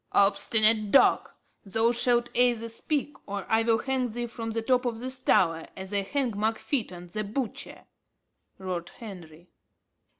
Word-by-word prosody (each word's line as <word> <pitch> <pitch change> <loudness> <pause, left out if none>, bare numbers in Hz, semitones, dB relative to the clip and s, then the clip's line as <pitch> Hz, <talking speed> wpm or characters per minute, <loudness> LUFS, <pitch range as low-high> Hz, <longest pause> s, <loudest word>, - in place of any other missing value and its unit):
"Obstinate 215 +1 +3
dog! 270 - +4 0.3
thou 225 +4 +1
shalt 240 0 +2
either 240 -2 +2
speak, 285 +5 -3
or 200 -1 -4
I 220 0 +3
will 225 0 +3
hang 260 0 -1
thee 240 +2 -4
from 230 -1 -6
the 225 0 -2
top 250 +1 +2
of 240 -3 -2
this 255 +2 -4
tower, 165 -9 +2
as 190 +1 -7
I 200 - +2
hanged 245 +2 -2
Mark 220 +2 0
Fytton 180 -10 -3
the 215 +4 -3
butcher," 225 +3 -5 0.7
roared 180 -2 -4
Henry. 175 -6 -11
225 Hz, 155 wpm, -27 LUFS, 200-245 Hz, 0.7 s, dog